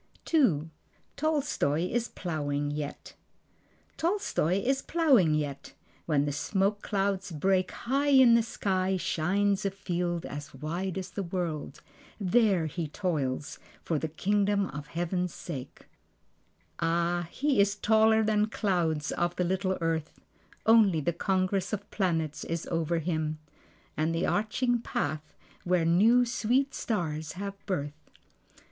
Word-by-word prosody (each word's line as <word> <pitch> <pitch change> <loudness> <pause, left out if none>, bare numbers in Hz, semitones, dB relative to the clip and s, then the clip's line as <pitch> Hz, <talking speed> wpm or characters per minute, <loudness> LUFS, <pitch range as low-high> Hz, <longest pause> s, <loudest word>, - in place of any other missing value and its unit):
II. 165 - +3 0.4
Tolstoi 280 - 0
Is 240 0 0
Plowing 145 -4 -3
Yet 145 -1 -6 0.8
Tolstoi 335 - 0
is 270 +1 +1
plowing 265 - +3
yet. 145 -2 -4 0.3
When 145 -3 +2
the 145 - -1
smoke 195 +7 0
clouds 195 -1 -1
break, 185 +4 +1
High 275 +4 -1
in 260 -4 +7
the 230 - +6
sky 190 -4 -1
shines 195 +4 +1
a 195 - +1
field 175 -3 -3
as 145 0 -7
wide 170 +7 -3
as 190 - -5
the 200 - -3
world. 170 -6 -4 0.4
There 200 -3 +3
he 160 +1 -3
toils 145 -6 -2 0.2
for 160 -3 -1
the 160 - -2
Kingdom 200 +4 +1
of 150 +2 -7
Heaven's 175 +2 -2
sake. 135 -6 -7 1.0
Ah, 170 +1 0
he 280 0 0
is 200 0 +2
taller 220 +1 +4
than 215 0 +2
clouds 170 -8 0
of 175 0 -1
the 180 - 0
little 185 +1 0
earth. 165 -1 -2 0.5
Only 220 -7 +5
the 160 +3 0
congress 190 +2 0
of 210 0 -4
planets 165 -6 -1
is 165 0 -3
over 165 0 0
him, 155 -2 -1 0.6
And 160 +2 0
the 165 - 0
arching 240 +3 +1
path 155 -8 -3 0.3
where 180 -2 +2
new 220 +9 +5
sweet 245 +3 +1
stars 160 -8 -2
have 200 +2 -6
birth. 150 -4 -4
180 Hz, 130 wpm, -29 LUFS, 160-210 Hz, 1.0 s, in